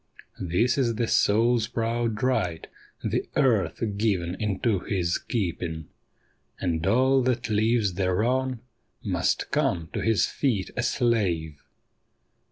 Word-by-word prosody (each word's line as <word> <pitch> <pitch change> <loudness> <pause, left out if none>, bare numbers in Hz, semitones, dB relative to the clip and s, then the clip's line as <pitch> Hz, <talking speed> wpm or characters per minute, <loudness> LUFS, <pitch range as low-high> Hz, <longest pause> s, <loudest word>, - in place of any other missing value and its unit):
This 105 +10 +1
is 120 -4 +1
the 115 +1 0
soul's 115 +2 +3
proud 115 -1 -2
right, 90 -11 0 0.4
the - - -1
earth 120 -7 +2
given 95 -5 0
into 105 0 0
his 90 -2 -1
keeping; 85 - -3 0.7
And 85 -1 -1
all 130 +5 +4
that 125 -2 -1
lives 110 -1 +2
thereon 115 +7 0 0.4
must - - -1
come 80 -2 0
to - - -2
his 115 -2 +3
feet 115 -9 -1
a - - 0
slave. 95 - 0
110 Hz, 115 wpm, -26 LUFS, 90-120 Hz, 0.7 s, all